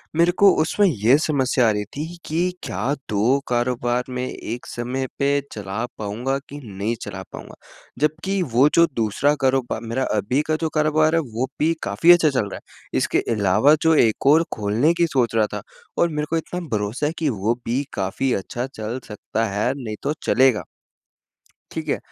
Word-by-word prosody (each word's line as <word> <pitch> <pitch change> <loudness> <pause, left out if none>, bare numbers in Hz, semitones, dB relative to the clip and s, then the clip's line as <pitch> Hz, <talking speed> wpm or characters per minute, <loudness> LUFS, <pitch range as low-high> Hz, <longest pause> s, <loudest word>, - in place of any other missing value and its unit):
मेरे 170 +1 +4
को 200 -1 +8
उसमें 185 +6 +2
ये 125 - +3
समस्या 130 -5 +1
आ - - +4
रही 105 -1 -1
थी 150 - -3 0.2
कि 175 +4 0
क्या 115 +10 -2 0.2
2 115 +7 +2
कारोबार 120 0 0
में 125 0 -3
एक 120 0 -6
समय 130 +2 -3
पे 140 0 +2
चला 105 +2 -4
पाऊँगा 115 +6 -2
कि 145 +1 -8
नहीं 105 +1 -3
चला 95 -2 -6
पाऊँगा? - - -9 0.4
जबकि 160 +7 0
वो 130 +5 +6
जो 170 - +7
दूसरा 115 +6 +1
कारोबार 130 -3 +1
मेरा 115 +3 -2
अभी 125 +8 +1
का 155 - +1
जो 160 - 0
कारोबार 155 +1 +3
है 165 - +3
वो 125 +4 -1
भी 160 +2 +3
काफ़ी 105 +13 +4
अच्छा 165 -3 +4
चल 125 -7 -1
रहा - - -6
है। - - -8
इसके - - +1
अलावा 105 +8 +4
जो 160 0 +4
एक 115 -3 +2
और 155 +4 +6
खोलने 110 +10 +1
की 170 0 +2
सोच 125 -6 0
रहा 110 -1 +3
था - - -4 0.4
और 170 - +2
मेरे 150 -1 -2
को 165 - +1
इतना 180 +2 -4
भरोसा 105 +5 -1
है 150 - +1
कि 160 -3 0
वो 110 0 0
भी 125 +4 0
काफ़ी 100 +7 -1
अच्छा 120 +6 -3
चल 110 +4 -4
सकता 110 +1 -3
है, 105 +5 0
नहीं 110 -5 -5
तो 145 - 0
चलेगा। 130 -3 +3 1.1
ठीक - - -5
है? - - +1
130 Hz, 185 wpm, -22 LUFS, 110-150 Hz, 1.1 s, को